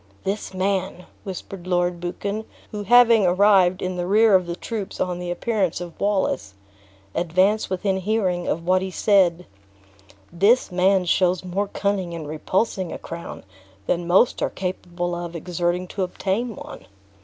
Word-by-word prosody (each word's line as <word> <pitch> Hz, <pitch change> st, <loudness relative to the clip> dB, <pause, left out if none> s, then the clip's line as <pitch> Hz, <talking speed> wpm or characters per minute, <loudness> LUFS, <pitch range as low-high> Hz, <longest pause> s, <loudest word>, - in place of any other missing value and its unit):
"This 200 Hz, +2 st, -3 dB
man," 190 Hz, -1 st, -2 dB, 0.2 s
whispered 190 Hz, -1 st, -7 dB
Lord 175 Hz, -1 st, 0 dB
Buchan, 200 Hz, +5 st, -4 dB, 0.3 s
who 210 Hz, -2 st, -4 dB
having 230 Hz, 0 st, +6 dB
arrived 185 Hz, 0 st, +4 dB
in 185 Hz, 0 st, -3 dB
the 175 Hz, 0 st, -2 dB
rear 215 Hz, +2 st, +5 dB
of 185 Hz, -2 st, +4 dB
the 170 Hz, -, -3 dB
troops 210 Hz, +1 st, -5 dB
on 180 Hz, -1 st, -1 dB
the 180 Hz, 0 st, -5 dB
appearance 190 Hz, -1 st, -1 dB
of 175 Hz, -2 st, -9 dB
Wallace, 190 Hz, -, 0 dB, 0.6 s
advanced 185 Hz, +6 st, +1 dB
within 190 Hz, +1 st, 0 dB
hearing 190 Hz, -3 st, -1 dB
of 165 Hz, +1 st, -2 dB
what 185 Hz, +1 st, +3 dB
he 190 Hz, -, -3 dB
said 180 Hz, -3 st, +2 dB, 0.9 s
"this 200 Hz, +7 st, +3 dB
man 185 Hz, +1 st, +3 dB
shows 180 Hz, 0 st, +2 dB
more 195 Hz, +3 st, -1 dB
cunning 195 Hz, -3 st, -2 dB
in 165 Hz, -2 st, -6 dB
repulsing 185 Hz, +5 st, -1 dB
a -, -, -5 dB
crown 170 Hz, 0 st, -8 dB, 0.4 s
than 170 Hz, +6 st, -1 dB
most 190 Hz, +7 st, +3 dB
are -, -, +1 dB
capable 175 Hz, -1 st, -4 dB
of 175 Hz, 0 st, -5 dB
exerting 175 Hz, +2 st, -2 dB
to 200 Hz, -, -4 dB
obtain 195 Hz, +5 st, -2 dB
one." -, -, -10 dB
185 Hz, 155 wpm, -23 LUFS, 175-200 Hz, 0.9 s, having